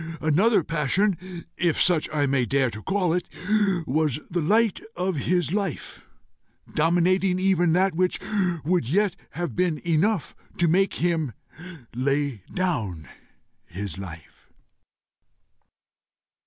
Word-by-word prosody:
Another 185 Hz, +6 st, +3 dB
passion, 175 Hz, +4 st, -1 dB
if 170 Hz, -3 st, +1 dB
such 175 Hz, -4 st, +3 dB
I 150 Hz, -2 st, +1 dB
may 135 Hz, -3 st, +1 dB
dare 135 Hz, -3 st, +1 dB
to 110 Hz, -, -7 dB
call 185 Hz, -, 0 dB
it, 180 Hz, -, -2 dB, 0.6 s
was 150 Hz, 0 st, 0 dB
the 175 Hz, 0 st, 0 dB
light 215 Hz, +6 st, +2 dB, 0.2 s
of 180 Hz, +1 st, -1 dB
his 175 Hz, +1 st, 0 dB
life, 195 Hz, -7 st, -3 dB, 0.7 s
dominating 180 Hz, +3 st, +2 dB
even 185 Hz, -3 st, +2 dB
that 190 Hz, +2 st, +3 dB
which 180 Hz, +2 st, 0 dB, 0.5 s
would 170 Hz, -8 st, +1 dB
yet 200 Hz, +3 st, +2 dB, 0.2 s
have 175 Hz, 0 st, -4 dB
been 175 Hz, -3 st, +1 dB
enough 175 Hz, +3 st, +1 dB, 0.2 s
to 175 Hz, -, +2 dB
make 190 Hz, +4 st, +2 dB
him 165 Hz, -7 st, 0 dB, 0.6 s
lay 135 Hz, -2 st, -1 dB
down 110 Hz, -, -2 dB, 0.6 s
his 95 Hz, +2 st, -6 dB
life." 85 Hz, -5 st, -11 dB
170 Hz, 115 wpm, -25 LUFS, 140-185 Hz, 0.7 s, Another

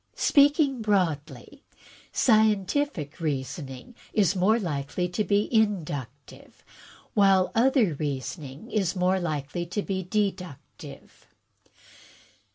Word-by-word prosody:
Speaking 285 Hz, -3 st, +3 dB
broadly, 180 Hz, -9 st, -2 dB, 0.5 s
scientific 215 Hz, -, +1 dB
reasoning 135 Hz, -, -5 dB, 0.2 s
is 195 Hz, -3 st, +2 dB
more 195 Hz, +5 st, +3 dB
likely 165 Hz, -2 st, -3 dB
to 180 Hz, +4 st, -1 dB
be 205 Hz, 0 st, +1 dB
inductive, 150 Hz, -, -2 dB, 0.5 s
while 195 Hz, -2 st, +4 dB
other 235 Hz, -, +3 dB
reasoning 140 Hz, -, -5 dB
is 195 Hz, -3 st, 0 dB
more 185 Hz, +1 st, +1 dB
likely 155 Hz, 0 st, -3 dB
to 195 Hz, +4 st, -3 dB
be 190 Hz, -1 st, -2 dB
deductive." 185 Hz, -5 st, -5 dB
185 Hz, 90 wpm, -26 LUFS, 150-215 Hz, 0.5 s, while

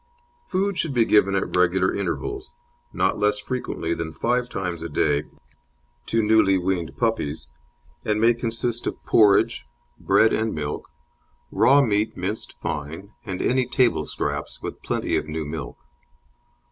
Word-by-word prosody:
Food 195 Hz, 0 st, 0 dB
should 150 Hz, -5 st, -1 dB
be 115 Hz, -2 st, +4 dB
given 100 Hz, -3 st, +4 dB
at 95 Hz, -, -1 dB
regular 90 Hz, +1 st, +3 dB
intervals 400 Hz, -, -4 dB, 0.4 s
not -, -, 0 dB
less 105 Hz, 0 st, +2 dB
frequently 105 Hz, -6 st, -3 dB
than 85 Hz, -1 st, -4 dB
five 125 Hz, +6 st, 0 dB
times 90 Hz, -6 st, -4 dB
a 85 Hz, -, -5 dB
day 75 Hz, 0 st, +1 dB, 0.8 s
to 115 Hz, -1 st, +1 dB
newly 105 Hz, -3 st, +4 dB
weaned 90 Hz, -2 st, -2 dB
puppies 80 Hz, -, -1 dB, 0.5 s
and 105 Hz, 0 st, 0 dB
may 115 Hz, +2 st, +5 dB
consist 120 Hz, 0 st, -2 dB
of -, -, -5 dB
porridge, 105 Hz, -3 st, +4 dB, 0.4 s
bread 110 Hz, -, +4 dB
and 110 Hz, 0 st, 0 dB
milk, 75 Hz, -1 st, -4 dB, 0.6 s
raw 140 Hz, +1 st, +5 dB
meat 105 Hz, -2 st, 0 dB
minced 100 Hz, +5 st, -4 dB
fine, 80 Hz, +7 st, -4 dB
and 95 Hz, -2 st, -3 dB
any 130 Hz, 0 st, +2 dB
table 125 Hz, -, +2 dB
scraps, -, -, -4 dB
with -, -, -7 dB
plenty -, -, -1 dB
of -, -, -3 dB
new 80 Hz, 0 st, -3 dB
milk. 75 Hz, 0 st, -6 dB
105 Hz, 145 wpm, -24 LUFS, 85-120 Hz, 0.8 s, may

